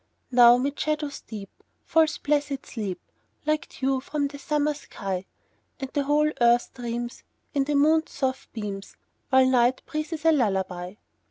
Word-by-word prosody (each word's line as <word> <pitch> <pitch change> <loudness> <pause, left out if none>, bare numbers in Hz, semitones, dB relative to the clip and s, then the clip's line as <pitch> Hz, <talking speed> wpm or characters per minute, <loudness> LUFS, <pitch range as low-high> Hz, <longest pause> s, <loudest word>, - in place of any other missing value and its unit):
Now 240 -1 +8
'mid 280 +3 -2
shadows 300 -2 -1
deep 205 -3 -8 0.3
Falls 320 0 +3
blessed 285 -2 -1
sleep, 200 -6 -4 0.5
Like 305 0 0
dew 265 0 0
from 285 +1 -2
the 285 0 -9
summer 300 +1 +1
sky; 195 -9 -5 0.5
And 270 -1 -5
the 285 -2 0
whole 300 +1 +3
earth 240 0 +4
dreams, 240 0 -5 0.3
In 275 -1 +1
the 295 +1 0
moon's 315 +3 +3
soft 265 -1 -2
beams, 200 -3 -6 0.3
While 260 0 +6
night 255 0 +3
breathes 310 +1 -4
a 325 - +7
lullaby. 190 - 0
270 Hz, 150 wpm, -26 LUFS, 235-295 Hz, 0.5 s, Now